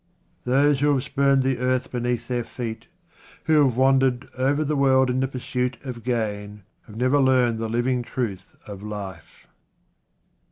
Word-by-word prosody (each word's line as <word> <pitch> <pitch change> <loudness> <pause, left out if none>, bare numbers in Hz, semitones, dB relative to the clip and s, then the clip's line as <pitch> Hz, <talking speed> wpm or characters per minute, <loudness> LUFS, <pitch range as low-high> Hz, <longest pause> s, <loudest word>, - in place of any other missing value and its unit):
Those 140 +2 +3
who 145 +1 +3
have 130 - -1
spurned 140 -1 +2
the 130 -2 0
earth 130 0 0
beneath 120 -1 -2
their 125 -1 -1
feet, 115 -1 -6 0.6
who 155 -2 +4
have 125 -4 +1
wandered 130 -1 +3
over 140 +4 +1
the 150 +1 -1
world 130 -2 +3
in 125 - 0
the 130 - +1
pursuit 125 -1 -3
of 125 -4 -7
gain, 105 -4 -3 0.2
have 105 - -12
never 130 +5 +2
learned 125 -4 +3
the 115 0 -3
living 120 +2 0
truth 110 -6 -5
of 100 -2 -9
life. 105 -3 -8
125 Hz, 160 wpm, -24 LUFS, 115-135 Hz, 0.6 s, who